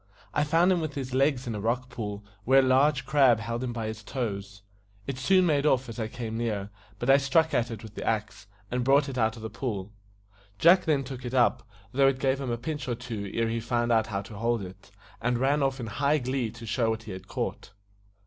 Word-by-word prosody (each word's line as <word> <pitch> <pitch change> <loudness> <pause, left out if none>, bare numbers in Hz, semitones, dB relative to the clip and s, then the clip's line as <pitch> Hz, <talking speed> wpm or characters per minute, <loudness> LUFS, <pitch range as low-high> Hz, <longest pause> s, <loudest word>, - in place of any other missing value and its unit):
I 145 - +2
found 165 +5 +3
him 180 -2 +2
with 155 -3 -4
his 130 -2 -4
legs 135 -1 +2
in 120 - -3
a 105 - -4
rock 120 +4 -1
pool, 105 -4 -6 0.2
where 135 +5 +6
a - - 0
large 135 +2 +3
crab 135 -6 +4
held 115 +3 -3
him 125 - -2
by 115 -2 -4
his 110 0 -5
toes. 100 -5 -4 0.4
It 135 -2 -4
soon 185 +7 +4
made 145 -4 +2
off 130 -3 +2
as 115 - -7
I 110 - -1
came 115 -1 -5
near; 105 -4 -2 0.3
but 120 - -4
I 135 +1 +7
struck 145 +4 +2
at 120 -1 +1
it 115 -1 -7
with 110 -2 -10
the - - -6
axe, 110 -2 -2 0.2
and 125 0 0
brought 140 +3 +4
it 130 -2 -4
out 110 -1 +2
of 110 - -10
the 110 - -4
pool. 105 -4 -4 0.7
Jack 180 - +6
then 145 -4 +2
took 130 -1 -8
it 125 +1 -4
up, 120 -2 +3 0.3
though 135 +1 +4
it 135 -1 +2
gave 135 0 0
him 135 - -3
a 120 - -1
pinch 145 +2 -4
or 120 - -1
two 115 -5 -5
ere 115 0 0
he 115 0 -1
found 120 +1 0
out 110 -1 +3
how 100 -1 -3
to 100 +2 -11
hold 115 -2 0
it, 95 +2 -11 0.3
and 120 +1 +1
ran 140 +4 +2
off 135 -1 0
in 120 - -4
high 140 +7 +1
glee 130 -3 -1
to 115 +1 -10
show 115 +1 0
what 110 0 -2
he 110 - -8
had 95 +1 -8
caught. - - -4
120 Hz, 245 wpm, -28 LUFS, 110-135 Hz, 0.7 s, I